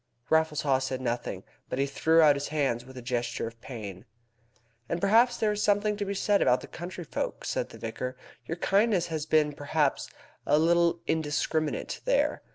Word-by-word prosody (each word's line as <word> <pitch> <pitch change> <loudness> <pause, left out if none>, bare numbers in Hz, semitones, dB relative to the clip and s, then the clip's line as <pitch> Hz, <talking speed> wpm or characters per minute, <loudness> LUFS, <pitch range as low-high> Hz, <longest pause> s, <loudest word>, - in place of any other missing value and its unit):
Raffles 160 -1 +3
Haw 135 -3 +2
said 130 -1 -3
nothing, 120 -1 -3 0.3
but - - -3
he 135 - +2
threw 160 +4 +3
out 150 -2 +6
his 140 0 -3
hands 135 -6 -1
with 130 0 -12
a 125 - -7
gesture 120 -1 -2
of 115 0 -9
pain. 105 -7 -8 0.8
"And 170 - -1
then 220 +6 +5
there 215 -1 +2
is 210 0 -2
something 210 0 +2
to 205 0 -3
be 200 0 -3
said 200 +1 +2
about 125 +1 +3
the - - -9
country 175 +1 -7
folk," - - -4
said - - -2
the - - -11
vicar. 125 +3 -5 0.3
"Your 165 - -3
kindness 195 0 +2
has 155 -1 -3
been, 150 -1 +3
perhaps, 145 0 0 0.3
a 145 - +3
little 170 +1 +3
indiscriminate 155 0 -1
there. - - +1
155 Hz, 185 wpm, -28 LUFS, 130-175 Hz, 0.8 s, out